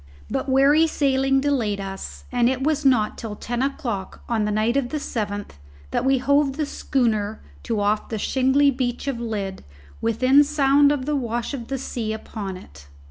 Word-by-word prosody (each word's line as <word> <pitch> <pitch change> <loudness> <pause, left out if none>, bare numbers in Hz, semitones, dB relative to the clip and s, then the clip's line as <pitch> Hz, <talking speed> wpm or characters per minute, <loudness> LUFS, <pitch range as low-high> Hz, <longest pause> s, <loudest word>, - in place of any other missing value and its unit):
But - - -2
wary 280 +5 +5
sailing 270 -2 +2
delayed 240 -8 0
us; 195 0 -7
and 245 -1 +3
it 260 0 -1
was 305 0 +1
not 245 -6 +2
till 220 -3 -5
ten 240 +3 -3
o'clock 235 -8 -3
on 225 -3 0
the 210 - -1
night 215 +3 +1
of 275 -3 0
the 305 - -2
seventh 205 - -4 0.3
that - - 0
we 265 0 +3
hove 280 +1 +2
the 305 - 0
schooner 220 -7 -1 0.2
to 215 - -2
off 205 +1 0
the 220 - -3
shingly 265 +5 +3
beach 245 -1 -2
of 265 -4 -2
Lydd 205 -5 -4 0.4
within 255 +5 +4
sound 285 -1 +4
of 275 -3 -1
the 300 +1 0
wash 240 -1 -2
of 240 -4 -5
the 270 - -2
sea 230 -4 -3
upon 205 -3 -6
it. 70 - -15
250 Hz, 185 wpm, -23 LUFS, 215-275 Hz, 0.4 s, wary